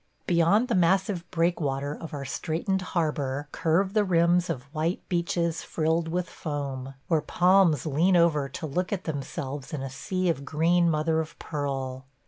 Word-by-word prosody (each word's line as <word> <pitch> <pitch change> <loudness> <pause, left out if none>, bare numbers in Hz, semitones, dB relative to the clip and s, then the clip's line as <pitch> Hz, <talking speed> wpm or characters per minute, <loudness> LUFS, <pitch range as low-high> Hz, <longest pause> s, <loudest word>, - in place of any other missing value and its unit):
Beyond 180 +7 +3
the 240 - 0
massive 185 0 +2
breakwater 145 -5 0
of 165 +1 -8
our 140 -2 -5
straitened 165 +7 -1
harbor 145 -5 -1
curve 185 +4 +1
the 215 -1 +3
rims 175 -1 +3
of 135 -7 -3
white 165 +3 -2
beaches 170 -1 0
frilled 160 +1 0
with 175 +1 -1
foam, 135 -4 -5
where 160 -3 +2
palms 180 -6 +3
lean 165 +5 +3
over 150 -5 +3
to 150 - -6
look 180 +5 -2
at 190 -3 -2
themselves 140 -2 -5
in 140 -3 -3
a 135 - -5
sea 185 +6 -2
of 160 -5 0
green 170 +4 +2
mother 160 +1 +1
of 160 -1 -5
pearl. 135 -3 -4
165 Hz, 160 wpm, -27 LUFS, 145-175 Hz, -, Beyond